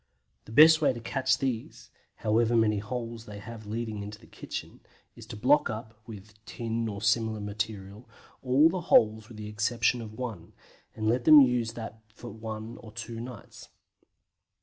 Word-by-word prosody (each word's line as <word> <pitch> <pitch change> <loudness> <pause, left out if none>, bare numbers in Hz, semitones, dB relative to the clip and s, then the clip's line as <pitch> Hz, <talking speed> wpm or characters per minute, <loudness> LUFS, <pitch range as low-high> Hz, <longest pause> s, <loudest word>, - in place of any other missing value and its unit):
The - - -12
best 155 +6 +7
way 145 - +3
to 120 - -7
catch 130 +3 0
these 125 -4 -4 0.2
however 115 +2 +1
many 105 -2 +2
holes 115 +1 -6
they 105 -1 -8
have 110 +1 -10
leading 110 -1 -4
into 105 +1 -7
the - - -19
kitchen - - -8 0.4
is 115 -2 -12
to 115 - -8
block 135 +8 +3
up 110 0 -6
(with 105 0 -12
tin 115 0 -3
or 100 -1 -6
similar 110 0 +1
material) 105 +1 -5 0.3
all 135 +4 +5
the 180 +2 -2
holes 110 -8 +3
with 115 -2 -12
the 105 -1 -7
exception 115 +3 0
of 110 -1 -9
one, 110 -10 -6 0.4
and 110 0 -2
let 120 +2 +1
them 155 -1 +10
use 125 -4 +3
that 110 -1 -8 0.4
one 110 +1 -6
for 110 - -12
two 115 0 -7
nights. 120 -2 -10
115 Hz, 170 wpm, -28 LUFS, 105-120 Hz, 0.4 s, them